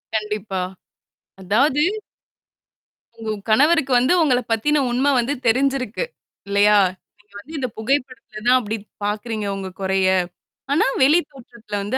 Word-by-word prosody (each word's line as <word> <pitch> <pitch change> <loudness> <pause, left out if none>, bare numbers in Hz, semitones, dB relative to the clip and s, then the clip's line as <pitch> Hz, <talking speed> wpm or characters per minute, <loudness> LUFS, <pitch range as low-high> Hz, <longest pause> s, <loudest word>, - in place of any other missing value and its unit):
கண்டிப்பா! 210 -3 -2 0.8
அதாவது 265 +10 +2 1.4
உங்க 220 -1 -3 0.2
கணவருக்கு 280 +3 +3
வந்து, 255 +8 +3
உங்கள 250 -5 +3
பத்தின 285 +7 +2
உண்ம 255 +3 +1
வந்து 240 +4 0
தெரிஞ்சிருக்கு, 265 - +1 0.4
இல்லையா? 205 +1 +4 0.4
நீங்க 210 0 -28
வந்து 305 +9 -9
இந்த 260 -3 -1
புகைப்படத்தில 240 -3 -3
தான் 255 +1 +6
அப்படி 220 -1 -4 0.3
பாக்கறீங்க 215 0 -3
உங்க 190 -1 -5
கொறைய. 190 0 +1 0.6
ஆனா, 290 - +3 0.2
வெளி 305 +6 +5
தோற்றத்துல 230 -6 -7
வந்து 210 +6 -2
230 Hz, 120 wpm, -21 LUFS, 210-270 Hz, 1.4 s, தான்